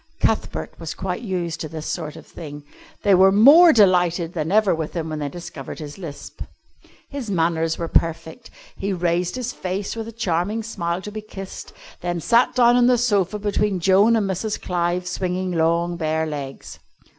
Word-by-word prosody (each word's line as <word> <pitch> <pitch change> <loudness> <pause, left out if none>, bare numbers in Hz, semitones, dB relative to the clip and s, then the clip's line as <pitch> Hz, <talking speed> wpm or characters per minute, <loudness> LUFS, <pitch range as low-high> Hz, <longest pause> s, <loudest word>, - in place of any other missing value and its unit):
Cuthbert - - -1
was - - -6
quite - - -4
used 175 -7 -3
to 155 - -5
this 155 0 -7
sort 155 -4 -4
of - - -12
thing. 145 -3 -9 0.4
They 200 - +4
were 190 +1 +6
more 290 - +8
delighted 180 - +3
than 160 0 -2
ever 215 -1 +4
with 160 0 -4
him 160 -2 -3
when 155 -1 -4
they 145 -1 -3
discovered 150 -4 -8
his 150 +2 -8
lisp. 155 -6 -9 0.7
His 275 -6 -5
manners 165 -3 0
were 170 - -3
perfect. 165 +8 -1 0.3
He 195 0 -2
raised 175 +1 0
his 250 -1 -4
face, 190 +3 -4
with 225 -1 -5
a - - -7
charming 210 0 -1
smile, 180 -5 -3
to 210 - -6
be 215 +1 -6
kissed, 195 -2 -9 0.3
then 175 -1 -2
sat 235 +7 +3
down 240 -1 +5
on 245 -1 +5
the 250 -1 +4
sofa 210 -5 +1
between 205 -1 0
Joan 195 +6 +4
and 215 -3 +1
Mrs. 200 +3 -2
Clive, 175 0 -1
swinging 180 0 -2
long 170 +1 +1
bare 160 -1 0
legs. 140 -3 -7
180 Hz, 180 wpm, -22 LUFS, 165-210 Hz, 0.7 s, more